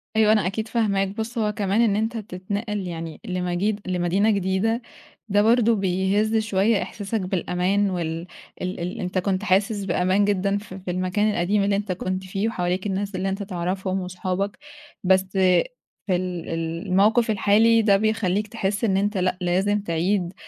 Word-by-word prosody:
أيوه، 215 -1 +5
أنا 210 -4 +3
أكيد 215 +4 -3
فاهماك، 200 -4 +1
بُصّ 220 +4 -5
هو 210 -1 +1
كمان 205 +1 0
إن 210 -4 +3
أنت 225 +2 -1
تتنقّل 205 0 -4
يعني 165 -2 -6
لمجيد 185 +2 -1
لمدينة 185 +4 +2
جديدة 200 +4 0 0.5
ده 205 +1 +4
برضه 230 +1 +4
بيهزّ 195 +3 +1
شوية 210 0 +2
إحساسك 210 +1 -3
بالأمان 185 +2 0
وال 170 -2 -3 0.3
ال 185 -1 -3
ال 175 +2 -4
أنت 185 0 -3
كنت 190 +1 0
حاسس 200 +1 +1
بأمان 185 +2 +2
جدًا 200 0 +1
ف 205 -2 -9
في 185 -1 -5
المكان 185 +4 0
القديم 200 +2 +1
اللي 200 0 +2
أنت 200 -1 -2
كنت 185 +1 -3
فيه 195 +3 -2
وحواليك 180 -2 -1
الناس 200 0 -2
اللي 190 +1 -1
أنت 195 +1 -3
تعرَفهم 185 0 -2
وأصحابك 185 +4 -3 0.5
بس 190 +1 +4
في 185 -2 +3 0.4
ال 180 -2 -1
ال 165 +3 -3
الموقِف 215 +5 +3
الحالي 220 +3 +4
ده 200 -2 +4
بيخلّيك 215 -1 0
تحس 205 -2 -2
إن 195 -4 +2
أنت 205 +1 0
لأ 185 0 0
لازم 195 +4 +1
تعيد 175 +1 0
195 Hz, 165 wpm, -24 LUFS, 185-210 Hz, 0.5 s, أيوه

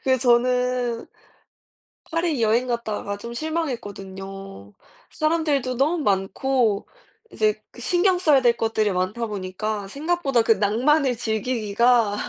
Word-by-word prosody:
그 260 -1 +2
저는 250 0 +1 1.0
파리 330 -5 0
여행 230 +3 +2
갔다가 215 -4 -3
좀 235 +3 -8
실망했거든요. 195 - -5 0.4
사람들도 305 -5 0
너무 290 +7 +1
많고 205 +3 +1 0.4
이제 430 -1 0
그 - - -12
신경 360 0 +2
써야 300 -7 +4
될 240 -2 +4
것들이 220 -3 0
많다 190 +6 -1
보니까 205 +1 -4
생각보다 290 - 0
그 225 0 +4
낭만을 245 +6 +2
즐기기가 225 -1 +1
235 Hz, 260 characters per minute, -23 LUFS, 205-275 Hz, 1.0 s, 써야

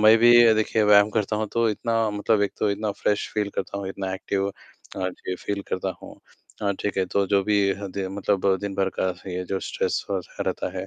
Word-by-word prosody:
मैं 110 +1 +7
भी 120 +1 +7 0.2
देखिए 110 0 +1
व्यायाम 105 0 +6
करता 105 0 0
हूँ, 110 0 -1
तो 115 -1 +2
इतना 115 0 0
मतलब 105 0 +1
एक 100 - 0
तो 105 - +1
इतना 105 +1 -2
फ्रेश 105 - 0
फ़ील 105 -1 0
करता 100 +1 -3
हूँ, 95 -1 -4
इतना 95 -1 -4
एक्टिव 95 +1 -2
अ, - - -6 0.6
जी, 90 - -6
फ़ील 100 +2 -4
करता 95 0 -1
हूँ - - -10 0.5
अ, 100 - +1
ठीक 105 - -2
है, 95 - +2
तो 100 +2 0
जो 100 0 +2
भी 105 0 +3 0.2
हदें 95 -1 -4
मतलब 100 -1 +2
दिन 100 -1 -4
भर 95 -1 +1
का 95 - +2 0.2
ये 90 +1 -3
जो 95 +1 -3
स्ट्रेस 470 -1 -1
और - - -1 0.2
ह - - +2
रहता - - -2
है - - -4
100 Hz, 225 wpm, -24 LUFS, 95-105 Hz, 0.6 s, मैं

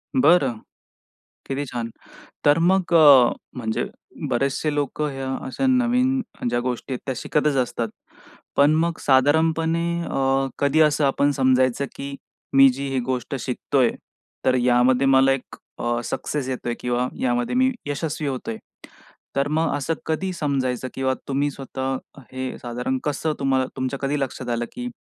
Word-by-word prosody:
बरं. 165 - +4 0.9
किती 140 +1 -2
छान! 120 -2 -4 0.6
तर 145 +2 +5
मग 180 +1 +2
अ, 145 -7 +8 0.3
म्हणजे 110 -2 -1 0.4
बरेचसे 140 +4 0
लोकं 145 +1 -1
ह्या 135 0 -5 0.2
अशा 270 - -2
नवीन 255 +1 +2 0.3
ज्या 120 - 0
गोष्टी 125 +1 -3
आहेत 125 - -4
त्या 135 - -1
शिकतच 150 +2 0
असतात. 120 -2 -1 0.7
पण 145 +1 +5
मग 165 +1 +1
साधारणपणे 160 +5 +2
अ, 135 -2 +1
कधी 140 +2 +3
असं 150 -1 +3
आपण 140 +1 +2
समजायचं, 130 -1 +2
की 140 0 -6 0.4
मी 135 0 +8
जी 135 +2 -3
ही 135 -1 0
गोष्ट 130 +1 -2
शिकतोय, 125 +1 +1 0.6
तर 130 - +4
यामध्ये 125 +1 +3
मला 135 0 +5
एक 135 -1 -3 0.2
अ, 120 0 0
सक्सेस 140 +3 -3
येतोय 120 -2 -3
किंवा 125 0 0
यामध्ये 120 - 0
मी 260 +1 +3
यशस्वी 150 +1 -3
होतोय? 125 -4 -4 0.8
तर 140 +1 +1
मग 155 0 0
असं 145 +3 -1
कधी 175 +4 -1
समजायचं 130 -6 -1
किंवा 130 0 0
तुम्ही 140 +1 0
स्वतः 135 -1 -4 0.4
हे 130 0 -4
साधारण 125 +2 -2
कसं 150 +2 -1
तुम्हाल 130 -1 +1
तुमच्या 130 +1 -3
कधी 140 +1 0
लक्षात 130 -2 -4
आलं 120 0 -1
की 245 0 -5
135 Hz, 145 wpm, -23 LUFS, 130-150 Hz, 0.9 s, अ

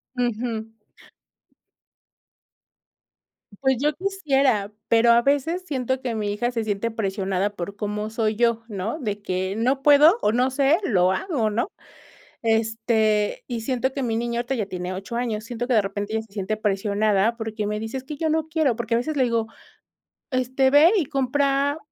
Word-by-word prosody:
Ujú. 230 -2 -2 2.9
Pues 265 -1 +3
yo 300 +1 +2
quisiera, 275 - +1 0.2
pero 235 +1 +5
a 235 - +6
veces 290 +6 +1
siento 260 -3 -2
que 250 -3 -3
mi 210 -2 -2
hija 240 +4 -1
se 230 -2 -2
siente 215 +2 -2
presionada 195 -2 -1
por 200 0 -6
cómo 210 +1 -3
soy 220 -1 0
yo, 235 0 +1
¿no?, 210 - -4
de 210 -5 -3
que 185 +1 -2
no 255 +4 +1
puedo 295 +7 +6
o - - +2
no 250 +3 +2
sé, 280 +4 +3
lo 185 - +3
hago, 245 - -1
¿no? 220 +3 -1 0.8
Este 225 -1 +1
y 235 -2 -3
siento 260 +1 -1
que 275 - -2
mi 230 -3 -1
niña 235 0 -1
ahorita 245 +3 -2
ya 220 -6 -2
tiene 180 -1 -5
8 195 +5 -6
años 225 -3 -2
siento 240 +1 -4
que 250 - +1
de 215 - +5
repente 200 +2 -4
ella 220 - 0
se 220 - -20
siente 200 +1 -2
presionada 210 +1 +1
porque 220 -2 -4
me 210 +1 -2
dice: 225 +4 -5
"Es 260 - -5
que 295 +2 -7
yo 320 +1 -1
no 315 0 0
quiero" 310 -7 +1
porque 230 -1 -2
a - - +4
veces 300 +5 -3
le 260 - +3
digo: 230 -2 0 0.8
"Este, 260 +1 +1
ve 300 +6 +7
y 365 - +2
compra 275 +1 +1
230 Hz, 180 wpm, -23 LUFS, 210-265 Hz, 2.9 s, ve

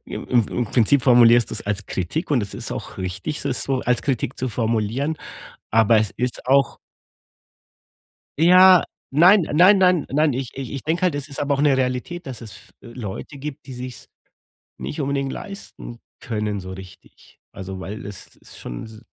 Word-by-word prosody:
im - - -7
im 120 -4 +2
im 120 - -1
Prinzip 120 +4 +3
formulierst 120 -2 +5
du - - -4
es - - -4
als 105 -1 -2
Kritik 150 - -3
und 130 -7 +2
es 100 - -6
ist - - -4
auch - - -7
richtig, 95 +11 -4
es - - -1
so 135 -2 -1
als 125 -1 0
Kritik 130 -2 -2
zu 130 - -2
formulieren, 115 +6 -1 0.5
aber 115 0 +4
es 110 -2 0
ist 125 0 -3
auch 135 +1 +3 1.6
Ja, 180 +2 +7 0.3
nein 175 +7 +6
nein 180 +7 +6
nein 180 -4 +3
nein, 150 +1 +2
ich 125 -1 -4
ich 135 -3 -6
ich 135 -3 -5
denke 165 +3 -1
halt, 180 -4 +2
es 145 0 -4
ist 140 - -8
aber 145 0 0
auch 140 - -1
'ne 145 -2 +4
Realität, 130 +7 -2
dass 130 -4 -7
es 110 -4 -9
f - - -17
Leute 120 +3 -8
gibt, 140 -1 -8
die 130 - -8
sich 125 0 -7
's - - -16 0.7
nicht 150 - -6
unbedingt 140 -1 -1
leisten 195 -11 -9 0.2
können 105 -3 -3
so 95 0 -9
richtig. 95 0 -14
Also, 95 -1 -7
weil 105 +4 -7
es 100 -1 -10
ist - - -15
schon - - -7
s 110 0 -12
125 Hz, 190 wpm, -22 LUFS, 110-145 Hz, 1.6 s, Ja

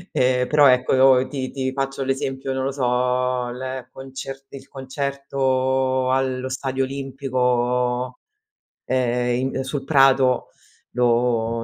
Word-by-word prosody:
Ehm, 125 0 +2
però 150 -1 +5
ecco, 130 0 +4
ti 130 -3 -4
ti 130 -1 -2
faccio 135 0 -3
l'esempio, 135 0 -2
non 130 0 -2
lo 135 - -1
so, 125 -1 0
l 130 0 -6
concer 135 0 -8
il 135 -1 -11
concerto 130 -1 -1
allo 130 0 -1
stadio 135 0 -2
Olimpico, 125 -2 -1 0.7
ehm, 125 0 0
in 135 - -1
sul 135 +1 -4
prato 135 -3 +3 0.4
lo 115 -1 +1
130 Hz, 115 wpm, -22 LUFS, 125-135 Hz, 0.7 s, però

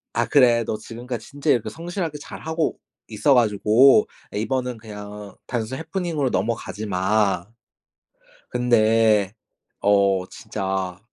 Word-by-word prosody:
아 120 - +2
"그래. 120 -3 +4
너 110 - -2
지금까지 120 +1 -7
진짜 145 +1 -4
이렇게 120 - +2
성실하게 170 -2 -4
잘 - - -9
하고 160 0 -1 0.3
있어 110 +6 +2
가지고 115 +2 +5 0.3
이번은 125 +2 -2
그냥 105 -2 -9
단순히 120 +1 -3
happening으로 165 -4 -2
넘어가지만 105 -3 0 1.0
근데 110 -4 +3 0.5
어 100 -2 +3
진짜 95 -4 -4
115 Hz, 290 characters per minute, -23 LUFS, 105-130 Hz, 1.0 s, 가지고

